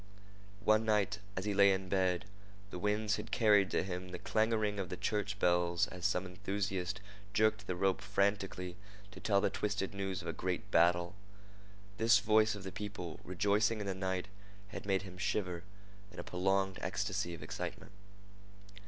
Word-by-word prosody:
One 110 +1 +5
night, 105 -2 +1 0.2
as - - -2
he 105 - 0
lay 100 0 +6
in 95 -1 -1
bed, 95 -2 +1 0.5
the 90 - -5
winds 105 +2 +1
had - - -6
carried 105 -5 +4
to - - +1
him 90 0 -5
the 90 - -5
clangoring 110 -2 +1
of 95 -3 -3
the 90 - -4
church 105 -2 -1
bell 85 -2 +2
as 90 -1 0
some 90 +1 0
enthusiast 95 +1 -3 0.4
jerked 110 -1 +2
the 90 - -1
rope 95 +1 +1
frantically 100 -2 -1 0.3
to - - -10
tell 100 -2 +2
the - - +1
twisted 100 -2 -2
news 95 -2 -3
of - - -7
a 85 - -2
great 95 +4 -3
battle. 85 +1 +4 0.8
This 115 0 +6
voice 110 +1 +3
of 100 - -8
the 95 - -5
people 100 -5 -6
rejoicing 105 +4 +1
in 105 - -3
the 100 - -1
night 95 0 -2 0.4
had 100 - -7
made 95 -1 +2
him 90 -2 -10
shiver 95 -4 -1 0.5
in 90 - -14
a - - -4
prolonged 95 +1 0
ecstasy 85 0 -2
of - - -10
excitement. - - -6
95 Hz, 170 wpm, -34 LUFS, 90-105 Hz, 0.8 s, lay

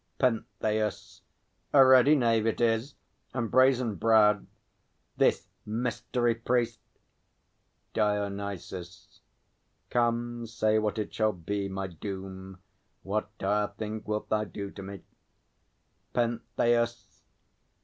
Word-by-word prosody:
PENTHEUS. 110 -3 -1 0.5
A 135 -2 +8
ready 130 +3 +7
knave 115 -4 +2
it 115 - 0
is, 115 +3 +1 0.4
and 120 -3 -2
brazen 130 -3 +4
browed, 105 0 +4 0.7
This - - +2 0.2
mystery 120 +1 -1
priest! 115 0 0 1.1
DIONYSUS. 100 -4 -3 0.7
Come, 120 0 0
say 110 -1 +1
what 105 -1 -1
it 105 -2 -3
shall 110 -1 +1
be, 100 +3 -3
My 95 0 -3
doom; 95 +1 -7 0.5
what 105 +2 -2
dire 105 +2 +1
thing 110 0 -4
wilt 105 0 -3
thou 105 0 +1
do 100 0 -6
to 100 - -9
me? 95 0 -8 1.1
PENTHEUS. 120 0 0
110 Hz, 100 wpm, -29 LUFS, 100-120 Hz, 1.1 s, A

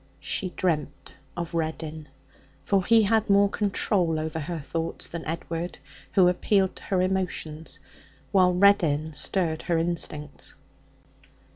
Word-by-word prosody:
She 185 - -2
dreamt 155 -5 -2 0.2
of 170 -1 -4
Reddin, 160 -1 -3 0.6
for 195 -2 +2
he 225 +3 +5
had 220 +1 +2
more 200 0 +6
control 190 -5 +1
over 160 +1 -3
her 165 +3 -4
thoughts 165 +2 -4
than 170 -1 -6
Edward, 165 +2 -4 0.4
who 185 -3 +6
appealed 190 +1 +2
to - - -10
her 185 -2 +1
emotions, 180 -4 -3 0.5
while 185 -2 +5
Reddin 170 -5 +3
stirred 160 0 0
her 170 -2 0
instincts. 155 -3 -3
170 Hz, 125 wpm, -26 LUFS, 160-190 Hz, 0.6 s, more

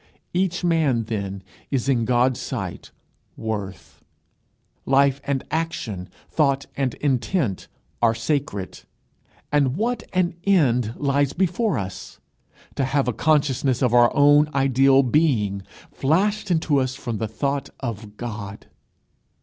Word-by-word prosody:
Each 180 0 0
man, 155 -9 +2
then, 100 -3 -4 0.3
is 135 -2 -1
in 120 -4 +2
God's 125 +1 +2
sight - - -5 0.5
worth. 105 -4 -6 0.8
Life 140 +1 +3
and 140 -2 -1
action, 115 - -3 0.2
thought 140 -3 +1
and 135 -3 -1
intent, 135 - -1 0.3
are 115 -1 +4
sacred. 115 -5 -3 0.7
And 140 -1 +2
what 235 +2 -1
an 180 -1 +1
end 125 - +2
lies 140 -1 +1
before 190 - 0
us! 95 -2 -6 0.6
To 135 - +1
have 135 0 0
a 125 - +1
consciousness 140 -3 +1
of 120 -2 +2
our 120 -1 +6
own 145 +1 +5
ideal 135 0 +4
being 120 -8 +1 0.3
flashed 200 +8 +1
into 160 -4 +2
us 130 0 -1
from 120 -5 -4
the 110 - -1
thought 140 +6 -2
of 110 -4 -6
God! 105 -4 -6
135 Hz, 125 wpm, -23 LUFS, 115-150 Hz, 0.8 s, our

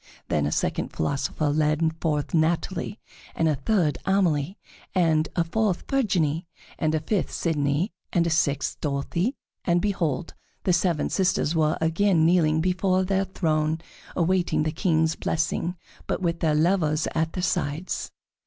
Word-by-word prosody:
Then 75 -1 +1
a - - -2
second - - -1
philosopher 140 - -1
led 155 +2 +1
forth 150 -3 -1
Natalie, 170 +4 0 0.4
and 165 - +2
a 155 - +3
third 155 +2 +1
Amelie, 185 -3 +1 0.4
and 160 -3 +3
a 170 - +3
fourth 200 +2 0
Virginie, 175 - +1 0.3
and 155 -1 +1
a - - +1
fifth 195 +4 -1
Sidonie, 150 +3 0 0.2
and 170 -2 +2
a 170 - 0
sixth 145 -4 0
Dorothée, 165 - -1 0.3
and 175 0 +2
behold! 170 -7 -1 0.3
the 180 - +2
seven 175 -2 +1
sisters 185 -5 +1
were 155 -1 +2
again 165 +1 +3
kneeling 160 -2 +3
before 185 +1 +1
the 195 +1 +1
throne 155 -4 0 0.4
awaiting 175 -2 +1
the 155 - 0
King's 160 -1 +1
blessing, 165 +2 -1 0.3
but - - -1
with 170 -2 -1
their 155 -2 +2
lovers 155 -1 +2
at 160 0 0
their 180 - -3
sides. 175 -1 -2
165 Hz, 145 wpm, -25 LUFS, 155-185 Hz, 0.4 s, a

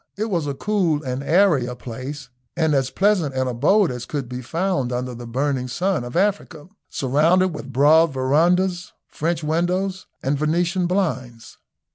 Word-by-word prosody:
It 215 +1 -2
was 165 -5 -1
as 140 - -3
cool 180 -8 0
and 130 0 -3
airy 160 -5 +3
a 125 - -5
place 130 +3 -7 0.3
and 160 -2 +2
as 135 -2 +1
pleasant 190 -8 +1
an 130 0 0
abode 155 - +2
as 125 -1 -6
could 140 -4 -4
be 125 +1 -6
found 165 -2 -1
under 125 0 -3
the 120 0 -9
burning 130 +1 -1
sun 175 +3 -1
of 120 0 -8
Africa, 190 -4 -1 0.2
surrounded 160 +8 +2
with 145 -5 -8
broad 155 +5 +5
verandahs, 175 +7 +1
French 165 +1 -2
windows, 180 +4 -1 0.2
and 135 +1 0
Venetian 175 +4 0
blinds. 130 - -3
150 Hz, 160 wpm, -22 LUFS, 130-180 Hz, 0.3 s, broad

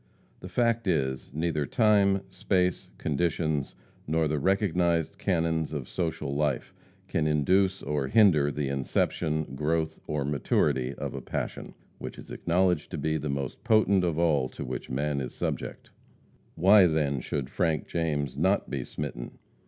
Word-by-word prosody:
The - - -9
fact 115 -2 +1
is, 65 -9 -1
neither 75 -1 -1
time, 100 - +3
space, 90 -1 0
conditions, 80 -1 -1 0.3
nor 80 +1 +1
the 75 0 -1
recognized 85 -2 +1
canons 80 -3 0
of 70 -5 -4
social 80 -5 -3
life, 75 -2 -1 0.3
can 75 -1 0
induce 95 +6 +2
or 75 -3 -1
hinder 90 -8 +5
the 75 -1 -2
inception, 70 +2 -1
growth, 80 +3 -1
or 75 -2 -1
maturity 70 -2 +1
of - - -5
a - - -5
passion, - - -5 0.2
which - - -7
is - - -11
acknowledged 90 -2 +1
to - - -5
be 80 0 0
the 75 0 -4
most 70 -2 -4
potent 105 -4 +4
of 85 -3 0
all 75 -6 +2
to - - -7
which 60 0 -5
man 70 +2 -1
is 65 - -6
subject. - - -4 0.6
Why, 95 +2 +7
then, 75 -4 0
should 70 +1 -4
Frank 80 -5 0
James 75 -5 -1
not - - +1
be - - -2
smitten? 70 -5 -6
80 Hz, 150 wpm, -28 LUFS, 70-90 Hz, 0.6 s, Why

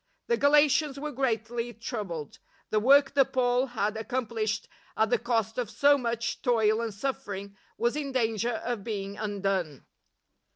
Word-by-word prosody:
The 470 - +1
Galatians 290 0 +4
were 300 +1 -4
greatly 240 -2 -2
troubled. 200 - -5 0.3
The 215 - +3
work 270 +5 +5
that 275 -3 +3
Paul 250 0 +2
had 215 -3 -1
accomplished 220 -3 -2 0.3
at 220 +1 +2
the 245 - +3
cost 225 -1 -1
of 240 -4 -2
so 285 +4 +4
much 235 -3 -2
toil 225 -3 +2
and 230 -1 -2
suffering 200 -4 -5 0.2
was 235 +3 +1
in 290 -2 -3
danger 230 -2 0
of 235 -4 -2
being 200 -2 -4
undone. 195 - -2
235 Hz, 150 wpm, -28 LUFS, 215-260 Hz, 0.3 s, work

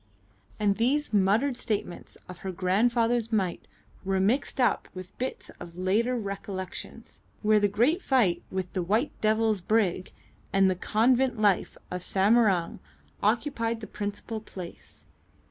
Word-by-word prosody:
And 205 -2 +2
these 270 +4 +1
muttered 210 +7 +3
statements 200 -7 -3
of 180 -1 -10
her 190 - -4
grandfather's 230 +5 +1
might 190 -5 -1 0.4
were 190 0 0
mixed 235 +9 0
up 245 - +2
with 185 0 -9
bits 255 +1 -4
of 175 0 -10
later 220 +7 +1
recollections, 195 -3 -6 0.2
where 215 0 +5
the 205 - +3
great 240 - +2
fight 240 - +2
with 185 -1 -4
the 185 - -1
"White 220 - +1
Devil's" 215 -2 +2
brig 185 -2 0 0.4
and 195 -1 +4
the - - -1
convent 240 +5 +2
life 205 -3 +2
in 180 - -2
Samarang 195 -2 +2 0.4
occupied 230 +1 0
the 220 - -7
principal 205 +2 -5
place. 185 -5 -10
210 Hz, 135 wpm, -27 LUFS, 190-235 Hz, 0.4 s, where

